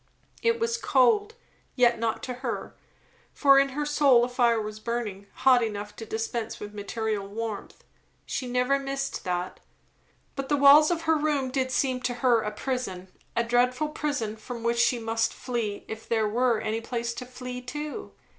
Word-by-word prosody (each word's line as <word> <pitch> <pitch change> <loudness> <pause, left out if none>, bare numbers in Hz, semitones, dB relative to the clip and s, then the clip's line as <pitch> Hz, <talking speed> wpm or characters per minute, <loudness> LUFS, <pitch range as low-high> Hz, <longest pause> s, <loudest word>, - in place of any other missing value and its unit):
It 465 0 +2
was 460 0 0
cold, 415 - +3 0.4
yet 240 -3 +4
not 225 -1 -1
to 255 - -3
her, 245 -3 -4 0.6
for 275 -1 +6
in 275 0 +3
her 295 +2 -3
soul 280 -5 +4
a - - -6
fire 240 -2 +3
was 215 0 -5
burning, 215 -4 -4
hot 255 -2 +5
enough 210 -1 -4
to 225 - -7
dispense 225 +1 -3
with 210 0 -8
material 210 0 -3
warmth. 215 0 -6 0.4
She 255 - -3
never 250 +3 +1
missed 275 0 -3
that. 180 0 -3 0.8
But 275 -1 -4
the 290 - +3
walls 285 +2 +8
of 335 -2 -1
her 320 0 +3
room 290 -4 0
did 260 -1 0
seem 255 -1 0
to 245 -1 -1
her 240 -2 +3
a 210 - -2
prison, 210 -5 -4 0.3
a 235 - +2
dreadful 250 +5 +1
prison, 285 -8 -3
from 230 +2 -7
which 235 0 +1
she 240 +1 +3
must 225 0 -1
flee 230 -5 -3
if 220 0 -8
there 220 -2 +2
were 235 +1 +2
any 220 +1 -2
place 235 0 -3
to 250 +2 -7
flee 250 0 -7
to. 295 - -6
245 Hz, 175 wpm, -27 LUFS, 225-275 Hz, 0.8 s, walls